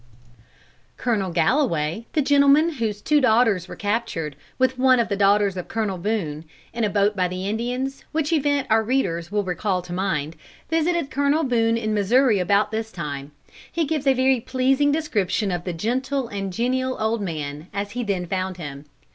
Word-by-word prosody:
Colonel 215 Hz, -6 st, 0 dB
Galloway, 170 Hz, -, +1 dB
the 300 Hz, -, +2 dB
gentleman 285 Hz, +3 st, +5 dB
whose 210 Hz, -3 st, -2 dB
two 300 Hz, -1 st, +3 dB
daughters 220 Hz, -7 st, +3 dB
were -, -, -8 dB
captured, 205 Hz, -8 st, -2 dB, 0.2 s
with 260 Hz, 0 st, +1 dB
one 255 Hz, -1 st, +5 dB
of 235 Hz, -, +1 dB
the 200 Hz, -, 0 dB
daughters 200 Hz, 0 st, +3 dB
of 180 Hz, -, -5 dB
Colonel 210 Hz, -5 st, -2 dB
Boone, 170 Hz, -7 st, -2 dB, 0.3 s
in 235 Hz, -, -2 dB
a 210 Hz, -, +2 dB
boat 205 Hz, +1 st, +2 dB
by 185 Hz, -2 st, +1 dB
the 185 Hz, +2 st, -4 dB
Indians, 250 Hz, +5 st, -3 dB
which 315 Hz, 0 st, 0 dB
event 285 Hz, -2 st, +1 dB
our 220 Hz, 0 st, +5 dB
readers 195 Hz, -8 st, -1 dB
will 205 Hz, 0 st, +1 dB
recall 185 Hz, 0 st, -1 dB
to 175 Hz, 0 st, -8 dB
mind, 170 Hz, -5 st, -2 dB, 0.4 s
visited 325 Hz, -2 st, +1 dB
Colonel 285 Hz, +3 st, +2 dB
Boone 230 Hz, -3 st, +2 dB
in 215 Hz, -2 st, -1 dB
Missouri 215 Hz, +2 st, +3 dB
about 200 Hz, +3 st, +2 dB
this 220 Hz, 0 st, -3 dB
time. 145 Hz, -5 st, -6 dB, 0.4 s
He 335 Hz, -1 st, 0 dB
gives 295 Hz, -2 st, -2 dB
a 270 Hz, -, +5 dB
very 260 Hz, 0 st, +3 dB
pleasing 260 Hz, +4 st, +1 dB
description 215 Hz, -, 0 dB
of 175 Hz, -1 st, -3 dB
the 180 Hz, -, -2 dB
gentle 255 Hz, +8 st, -1 dB
and 195 Hz, -1 st, -4 dB
genial 255 Hz, +5 st, -1 dB
old 220 Hz, 0 st, 0 dB
man, 150 Hz, -4 st, -5 dB
as 200 Hz, +1 st, -4 dB
he 245 Hz, +2 st, -3 dB
then 195 Hz, -5 st, -1 dB
found 185 Hz, +1 st, -3 dB
him. 145 Hz, -3 st, -8 dB
220 Hz, 180 wpm, -23 LUFS, 185-260 Hz, 0.4 s, gentleman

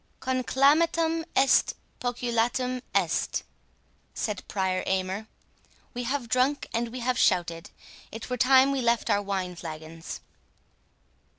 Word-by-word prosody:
"'Conclamatum 310 Hz, +6 st, +2 dB
est, 270 Hz, 0 st, +4 dB, 0.2 s
poculatum 245 Hz, +1 st, -1 dB
est'," -, -, +1 dB, 0.7 s
said 210 Hz, -3 st, -3 dB
Prior 190 Hz, -2 st, 0 dB
Aymer; 190 Hz, +3 st, -1 dB, 0.7 s
"we 245 Hz, 0 st, -4 dB
have 260 Hz, -1 st, -2 dB
drunk 255 Hz, +5 st, +1 dB
and 235 Hz, +1 st, 0 dB
we 245 Hz, +2 st, -7 dB
have 250 Hz, +1 st, 0 dB
shouted,—it 175 Hz, +5 st, -2 dB
were 250 Hz, -, -2 dB
time 265 Hz, +2 st, +5 dB
we 275 Hz, -1 st, 0 dB
left 235 Hz, -1 st, +1 dB
our 205 Hz, -, +3 dB
wine 190 Hz, -3 st, -3 dB
flagons." 160 Hz, 0 st, -8 dB
240 Hz, 110 wpm, -27 LUFS, 190-260 Hz, 0.7 s, time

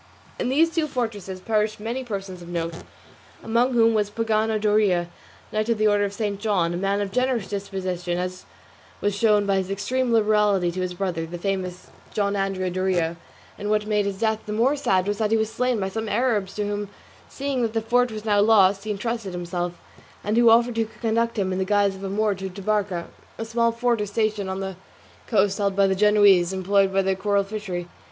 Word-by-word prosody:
In -, -, 0 dB
these 325 Hz, +5 st, +3 dB
two 320 Hz, -2 st, 0 dB
fortresses 215 Hz, -8 st, -4 dB
perished 215 Hz, +1 st, 0 dB
many 235 Hz, +5 st, -3 dB
persons 195 Hz, -6 st, -6 dB
of 170 Hz, -, -10 dB
note, 170 Hz, -1 st, -3 dB, 0.7 s
among 235 Hz, +3 st, +1 dB
whom 230 Hz, -1 st, +4 dB
was 210 Hz, -2 st, +1 dB
Pagano 220 Hz, 0 st, 0 dB
Doria, 205 Hz, -5 st, +2 dB, 0.4 s
knight 215 Hz, +1 st, -1 dB
of 230 Hz, -, +2 dB
the 215 Hz, -, +1 dB
Order 205 Hz, -1 st, +3 dB
of 200 Hz, -, -4 dB
St. 205 Hz, -1 st, -2 dB
John, 195 Hz, -6 st, +1 dB
a -, -, -2 dB
man 195 Hz, +2 st, 0 dB
of 200 Hz, -1 st, -3 dB
generous 250 Hz, -2 st, 0 dB
disposition, 185 Hz, -3 st, -3 dB
as 180 Hz, +1 st, -4 dB, 0.5 s
was 205 Hz, -1 st, 0 dB
shown 210 Hz, -1 st, +3 dB
by 195 Hz, -1 st, +2 dB
his 190 Hz, -1 st, -2 dB
extreme 240 Hz, +6 st, -1 dB
liberality 210 Hz, -5 st, +3 dB
to 185 Hz, +2 st, -4 dB
his 180 Hz, -1 st, -3 dB
brother, 175 Hz, -3 st, -2 dB
the 175 Hz, +2 st, -6 dB
famous 185 Hz, -1 st, -4 dB, 0.2 s
John 200 Hz, -1 st, +1 dB
Andrea 195 Hz, -2 st, -1 dB
Doria; 180 Hz, -3 st, 0 dB, 0.4 s
and 205 Hz, -, -3 dB
what 210 Hz, 0 st, +1 dB
made 210 Hz, -1 st, +1 dB
his 195 Hz, -1 st, -4 dB
death 220 Hz, -1 st, +1 dB
the 210 Hz, -, -3 dB
more 245 Hz, +7 st, +2 dB
sad 190 Hz, -9 st, +1 dB
was 205 Hz, 0 st, -1 dB
that 215 Hz, -1 st, +1 dB
he 225 Hz, -, +3 dB
was 220 Hz, 0 st, -1 dB
slain 250 Hz, 0 st, 0 dB
by 190 Hz, -1 st, -1 dB
some 220 Hz, +2 st, -4 dB
Arabs 210 Hz, -4 st, 0 dB
to 210 Hz, -, -1 dB
whom, 205 Hz, 0 st, -3 dB, 0.4 s
seeing 275 Hz, -2 st, -2 dB
that 225 Hz, -2 st, -1 dB
the 225 Hz, -, +1 dB
fort 245 Hz, +2 st, +2 dB
was 215 Hz, 0 st, -7 dB
now 205 Hz, -2 st, +3 dB
lost, 200 Hz, -2 st, +4 dB
he -, -, -4 dB
entrusted 210 Hz, -1 st, -3 dB
himself, 175 Hz, 0 st, -3 dB, 0.5 s
and 210 Hz, +1 st, 0 dB
who 235 Hz, 0 st, +6 dB
offered 235 Hz, +2 st, +5 dB
to 225 Hz, -1 st, -1 dB
conduct 230 Hz, 0 st, 0 dB
him 190 Hz, -2 st, 0 dB
in 185 Hz, -, -2 dB
the -, -, +1 dB
disguise 200 Hz, 0 st, +2 dB
of 190 Hz, -, -10 dB
a 195 Hz, -, -3 dB
Moor 210 Hz, +1 st, +1 dB
to 190 Hz, 0 st, -6 dB
Tabarca, 195 Hz, -2 st, -1 dB, 0.3 s
a 225 Hz, -, -4 dB
small 230 Hz, +1 st, +1 dB
fort 235 Hz, -1 st, 0 dB
or 210 Hz, -, -2 dB
station 210 Hz, -1 st, -1 dB
on 190 Hz, +1 st, -3 dB
the 190 Hz, -1 st, -4 dB, 0.5 s
coast 200 Hz, -1 st, +2 dB
held 200 Hz, -1 st, 0 dB
by 200 Hz, 0 st, +4 dB
the 190 Hz, -, +2 dB
Genoese 200 Hz, -3 st, +4 dB
employed 195 Hz, +1 st, +2 dB
in 195 Hz, -1 st, +2 dB
the 190 Hz, 0 st, +1 dB
coral 200 Hz, +1 st, +1 dB
fishery. 195 Hz, -4 st, -5 dB
205 Hz, 215 wpm, -24 LUFS, 190-225 Hz, 0.7 s, who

